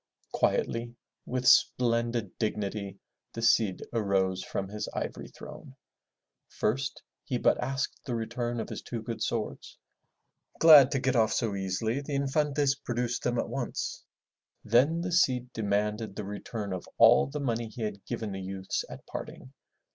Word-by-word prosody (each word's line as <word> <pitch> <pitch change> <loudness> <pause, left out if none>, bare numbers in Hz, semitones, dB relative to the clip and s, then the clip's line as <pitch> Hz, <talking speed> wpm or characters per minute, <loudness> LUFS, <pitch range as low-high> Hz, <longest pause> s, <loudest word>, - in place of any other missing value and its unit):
Quietly, 115 +1 0 0.3
with 125 0 -1
splendid 115 -4 +3
dignity, 100 -2 -2 0.4
the 115 - -5
Cid 110 -4 +3
arose 95 -4 +1
from 95 - -3
his 105 +2 -5
ivory - - -4
throne. - - -11 0.7
First 125 +5 -2 0.2
he - - -2
but - - +2
asked 135 +2 -3
the 125 -4 -3
return 120 +1 -3
of - - -4
his - - -5
two 115 -2 -6
good 115 0 -5
swords. 115 -2 -3 0.8
Glad 150 -5 +9
to 140 - +1
get 130 0 0
off 110 -2 +3
so 115 -4 0
easily, 100 +6 -1
the 145 0 -4
Infantes 140 0 +1
produced 125 -3 -2
them 120 0 0
at - - 0
once. - - -4 0.6
Then 135 +10 +3
the 180 +1 -3
Cid 125 -7 +2
demanded 105 0 -1
the 105 - -5
return 105 0 -5
of 90 - -6
all - - +7
the 145 +2 -5
money 120 -4 -1
he 110 +1 -7
had 105 -2 -4
given 115 -3 -3
the 95 0 -5
youths 95 0 -3
at - - -10
parting. 130 - -8
115 Hz, 155 wpm, -29 LUFS, 105-130 Hz, 0.8 s, Glad